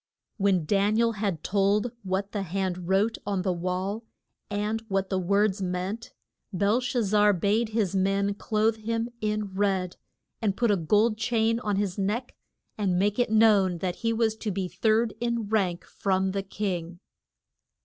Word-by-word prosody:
When 195 -5 +2
Dan 205 +5 +2
i - - +4
el 230 0 +3
had 200 -7 -3
told 205 +3 +1
what 195 +1 -2
the 205 - -2
hand 185 -1 -3
wrote 205 +4 +2
on 195 -2 -1
the 185 - +1
wall, 185 +5 -3 0.5
and 210 +2 -1
what 195 -1 -1
the 190 - +1
words 200 +2 +1
meant, 185 +5 -3 0.4
Bel 205 +5 +2
shaz 245 -4 -1
zar 210 0 +5
bade 205 +5 +1
his 215 -4 0
men 195 +1 +1
clothe 215 +2 0
him 230 +2 -2
in 210 -2 -2
red, 190 -2 0 0.4
and 205 -3 0
put 235 -3 +2
a - - +4
gold 210 +6 +2
chain 230 0 +1
on 210 -4 -1
his 200 -1 -1
neck, 215 +6 -2 0.5
and 190 -4 +1
make 205 +4 +1
it 245 - +2
known 210 -5 +4
that 180 +1 -3
he 230 -1 0
was 225 -1 +1
to 220 - -3
be 190 -1 -2
third 220 +3 +1
in 235 -3 -1
rank 190 -6 0
from 190 -1 0
the 195 +1 -1
king. 180 -3 -4
205 Hz, 170 wpm, -27 LUFS, 190-220 Hz, 0.5 s, zar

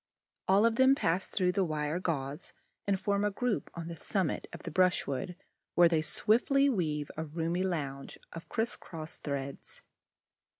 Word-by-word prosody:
All 195 +3 +5
of 230 0 +3
them 265 +1 +6
pass 175 -4 0
through 180 -2 +2
the 190 +1 +2
wire 155 0 -1
gauze 145 -3 -3 0.3
and 195 -1 +2
form 200 +1 +1
a 210 - +3
group 225 +2 -1
on 170 -1 -5
the 170 - -5
summit 185 +1 -1
of - - -9
the - - -5
brushwood, 180 -4 +1 0.4
where 175 0 +8
they 160 -2 +2
swiftly 275 - +3
weave 155 - -1
a 160 - -1
roomy 165 +3 -1
lounge 140 -7 -3 0.2
of 165 - -9
criss 225 +1 -1
cross 160 -2 -8
threads. 140 -1 -5
175 Hz, 165 wpm, -31 LUFS, 155-200 Hz, 0.4 s, where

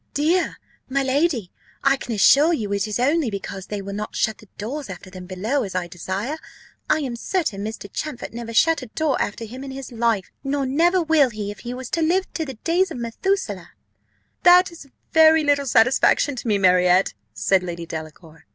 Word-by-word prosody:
"Dear, 330 +5 +1 0.3
my 275 +1 +1
lady! 265 - 0 0.3
I 275 0 +4
can 250 - -7
assure 290 - +5
you 210 -9 -2
it 200 +1 0
is 210 - -2
only 285 +1 +2
because 195 -2 -6
they 205 -2 -4
will 200 0 -6
not 210 +1 -5
shut 220 -1 0
the 215 - -16
doors 255 +5 -5
after 185 0 -9
them 185 -1 -9
below, 215 +10 -1
as 190 -3 -5
I 180 -1 0
desire. 190 - -4 0.5
I 310 - +3
am 255 -4 -3
certain 235 - -2
Mr. 220 -1 -6
Champfort 295 -8 -5
never 235 -1 -6
shut 320 +7 +3
a 255 - -8
door 295 +4 -1
after 225 +3 -3
him 255 +5 -9
in 275 - -7
his 265 -1 -7
life, 230 -5 0
nor 275 0 -1
never 340 +7 +2
will 310 -4 +4
if 205 -2 -5
he 245 0 -6
was 255 -1 -7
to 330 - 0
live 360 +4 +2
to 320 - -2
the 270 -3 -7
days 340 - +1
of 320 - -6
Methuselah." 235 - -2 0.7
"That 360 0 +6
is 335 -4 -12 0.3
very 320 0 +6
little 285 -1 +2
satisfaction 255 +4 +3
to 240 - -5
me, 210 -2 +3
Marriott," 180 0 +4 0.2
said 180 - +2
Lady 170 -2 -5
Delacour. 160 0 -9
240 Hz, 195 wpm, -22 LUFS, 200-300 Hz, 0.7 s, That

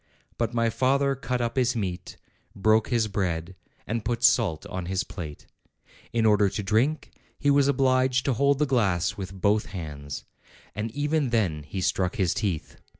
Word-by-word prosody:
But 115 -1 0
my 115 -1 +1
father 140 +3 +2
cut 125 -2 -3
up 120 +2 -2
his 125 -1 +2
meat, 90 -5 -4 0.4
broke 110 +2 +3
his 115 -3 +1
bread, 95 -4 -2 0.3
and 115 0 -2
put 120 +2 -2
salt 105 -10 +3
on 90 -2 -5
his 95 0 0
plate. 75 -5 -8 0.7
In 115 -1 +1
order 105 -2 +4
to 105 - -4
drink, 130 +9 +1 0.3
he 145 - +2
was 140 -1 +4
obliged 130 -1 +2
to 135 - +2
hold 140 +3 +3
the 150 - +2
glass 100 - +1
with 95 -2 -6
both 105 +3 +2
hands, 75 -6 -7 0.5
and 105 +3 -3
even 145 -1 0
then 100 -10 0
he 95 +6 -5
struck 90 0 0
his 95 -4 +1
teeth. 95 -8 -3
110 Hz, 170 wpm, -26 LUFS, 95-130 Hz, 0.7 s, order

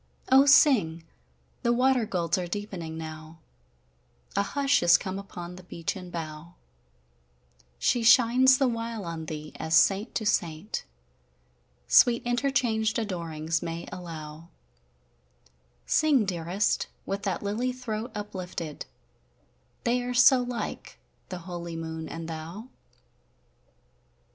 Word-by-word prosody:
O 270 +2 +7
sing! 210 - +5 0.6
the 235 - +2
water 250 -1 +2
golds 170 -3 0
are 180 -1 -2
deepening 175 -4 -5
now, 155 0 -8 1.0
A - - +3
hush 280 +7 +1
is 175 0 +6
come 190 0 -5
upon 180 -3 -8
the - - -10
beechen 180 +1 -5
bough; 165 0 -7 1.2
She 240 - +1
shines 250 +3 +6
the 270 - +2
while 230 -3 -3
on 165 -1 -5
thee, 150 0 -6
as 160 +1 0
saint 200 +6 +3
to 220 - -1
saint 175 -1 -1 1.0
Sweet 235 -1 +5
interchanged 240 -3 +1
adorings 165 -6 -2
may 170 0 -5
allow: 165 -3 -8 1.4
Sing, 290 -8 +3
dearest, 180 +2 -1 0.2
with 195 +1 -3
that 195 0 -2
lily 220 +5 -1
throat 240 -3 -5
uplifted; 185 -6 -6 1.0
They 245 +1 +1
are 245 0 -3
so 255 +1 +7
like, 245 -1 -5 0.3
the 185 - -5
holy 170 -2 -6
Moon 160 0 -5
and 165 0 -6
thou! 165 +9 -7
190 Hz, 115 wpm, -27 LUFS, 165-235 Hz, 1.4 s, O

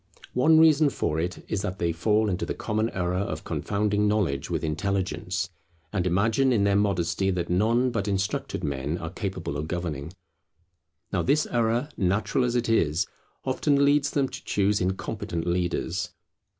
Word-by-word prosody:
One 155 +6 +5
reason 155 -2 +6
for 80 - -1
it 90 +3 -3
is 100 - -1
that 95 -2 -3
they 85 -2 0
fall 105 +6 +2
into 95 -1 -1
the - - -3
common 110 0 -1
error 90 -2 -1
of 100 - -3
confounding 105 0 0
knowledge 95 -10 0
with - - -2
intelligence, 90 +1 -2 0.4
and 90 -3 0
imagine 110 +9 +2
in 110 -5 +3
their 100 0 +3
modesty 95 -2 +1
that 90 -2 -1
none 115 +7 +2
but 115 -4 -2
instructed 100 0 -2
men 70 +3 -2
are 80 -1 -5
capable 95 -7 -4
of 75 +1 -3
governing. 80 -4 -4 1.0
Now - - +2
this 150 +3 +2
error, 120 +4 +1
natural 100 +7 +1
as 120 0 -1
it 120 -1 +1
is, 85 -6 +2 0.4
often 140 -1 +2
leads 145 0 +3
them 140 -2 +1
to 130 - -8
choose 100 0 +1
incompetent 90 -2 -2
leaders. 85 0 -1
100 Hz, 165 wpm, -26 LUFS, 85-115 Hz, 1.0 s, reason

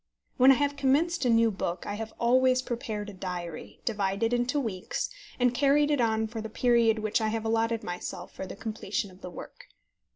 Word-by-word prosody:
When 255 +1 +7
I - - +6
have 285 +1 0
commenced 285 +3 +2
a - - +3
new 230 -1 +4
book, 180 -3 -3
I 205 - -3
have 220 +1 -5
always 255 +1 +4
prepared 220 -4 -4
a 205 - -8
diary, 180 -3 -6
divided 205 +1 0
into 245 +4 +1
weeks, 210 - -3 0.3
and 245 -1 +3
carried 290 +3 +3
it 290 -4 +2
on 220 -1 +2
for 220 0 -5
the 220 - -6
period 235 -1 +3
which 215 +2 0
I 220 - +1
have 225 0 -2
allowed 225 0 +1
myself 180 0 -6
for 190 - -6
the - - -7
completion 210 -2 -3
of 185 +1 -18
the 180 - -6
work. 175 - -10
225 Hz, 200 wpm, -28 LUFS, 205-250 Hz, 0.3 s, When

